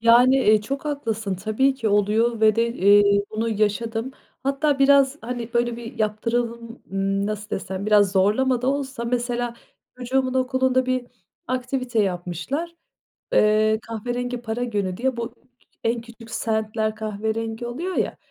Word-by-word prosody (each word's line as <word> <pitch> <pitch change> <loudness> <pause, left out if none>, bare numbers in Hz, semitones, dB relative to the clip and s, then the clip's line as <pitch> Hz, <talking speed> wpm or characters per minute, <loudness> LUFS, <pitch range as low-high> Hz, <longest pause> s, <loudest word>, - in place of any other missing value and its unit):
Yani, 245 +3 +6
e, 215 -4 +4
çok 275 +7 -4
haklısın. 225 -9 -2
Tabii 215 +8 +1
ki 230 -5 -1
oluyor 215 +3 +2
ve 215 -1 +5
de, 230 0 +2
eee, 200 0 +5
bunu 220 +1 -1
yaşadım. 225 +3 -1 0.3
Hatta 275 +2 +1
biraz, 275 0 +5
hani, 240 0 -5
böyle, 240 0 +1
bir 235 -1 -9
yaptıralım 230 +2 -2
Imm, 195 +1 0
nasıl 215 0 -4
desem, 190 +1 -4
biraz 205 -2 +4
zorlama 235 +6 +2
da - - -1
olsa 270 -3 -2
mesela 240 0 -1 0.4
çocuğumun 255 +1 0
okulunda 260 0 +2
bir 255 -1 -1 0.4
aktivite 255 -2 -1
yapmışlar. 190 - -3 0.6
Eee, 215 +1 +4
kahverengi 245 +2 -3
para 235 +1 -2
günü 200 -6 -2
diye 260 +2 -1
bu 230 -1 -3
k - - -34
k - - -32 0.4
en 230 +1 +1
küçük 230 0 -13
sentler 220 -1 -1
kahverengi 220 +2 -3
oluyor 335 +10 -4
ya. - - 0
230 Hz, 150 wpm, -23 LUFS, 215-255 Hz, 0.6 s, Yani